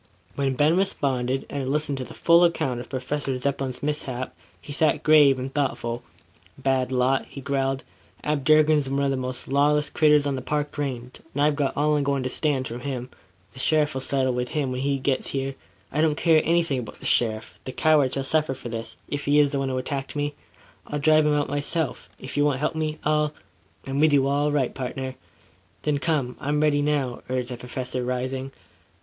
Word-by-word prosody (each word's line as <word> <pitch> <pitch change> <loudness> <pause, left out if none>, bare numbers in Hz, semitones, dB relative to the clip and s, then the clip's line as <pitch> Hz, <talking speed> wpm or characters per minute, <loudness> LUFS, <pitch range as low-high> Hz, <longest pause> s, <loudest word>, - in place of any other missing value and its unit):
When 135 -2 0
Ben 150 +5 +3
responded, 135 -9 0
and 140 - -4
had 130 - -3
listened 145 -1 0
to - - -2
the - - -10
full 170 +1 +5
account 135 -7 +1
of 120 - -8
Professor 135 0 -2
Zepplin's 135 -1 -3
mishap, 135 -4 -3 0.3
he 145 - -8
sat 155 +1 +2
grave 150 -3 +6
and 130 +1 -5
thoughtful. 120 -4 -1 0.6
"Bad 130 -1 0
lot," 130 +1 +1
he - - -9
growled. 135 0 -1 0.4
"Ab 150 -2 0
Durkin's 155 -1 +4
one 140 +1 0
of 140 - +2
the - - +1
most 130 -1 -4
lawless 145 +2 +2
critters 150 -2 +4
on 140 -1 0
the 130 - -4
Park 150 +2 -2
Range; 130 -4 -4 0.2
and 145 - 0
I've 150 0 +3
got 145 -2 -1
all 150 +1 +3
I'm 145 - +1
goin' 140 -1 0
to 130 - -1
stand 140 -4 0
from 120 +1 -6
him. 125 -1 -5 0.4
The 130 - -12
sheriff 150 +2 +2
will 130 - -3
settle 130 -1 0
him 130 +2 -1
when 125 0 -3
he 140 0 +1
gits 130 0 -1
here 135 0 -2 0.2
" 100 0 -34
"I 150 - 0
don't 155 -2 +3
care 160 0 +4
anything 165 -5 +2
about 120 - -8
the - - -11
sheriff. 110 -2 +2
The 130 - -4
coward 145 -3 +3
shall 135 - -1
suffer 155 0 +1
for 125 -2 -8
this, 115 0 -5
if 145 0 -4
he 145 +1 +3
is 145 -1 +5
the 140 - -1
one 135 -1 -1
who 130 - -1
attacked 135 +2 -4
me. 145 0 -1 0.5
I'll 150 - -3
drive 155 +1 +4
him 150 - +3
out 145 -1 +1
myself, 145 +2 -2
if 130 - -7
you 145 - +4
won't 145 -3 +2
help 150 +4 -1
me. 155 -1 -2
I'll 150 0 +1 0.2
" - - -33
"I'm 135 +1 -2
with 155 0 +4
you 135 -1 +4
all 145 +1 +1
right, 140 -4 0
pardner." 130 0 -4 0.7
"Then, 150 -2 +1
come. 140 -5 -1
I'm 150 +1 0
ready 150 -1 +3
now," 145 -4 0
urged 130 -1 -1
the 125 - -5
Professor 125 +1 -4
rising. 130 +2 -3
140 Hz, 215 wpm, -25 LUFS, 130-150 Hz, 0.7 s, grave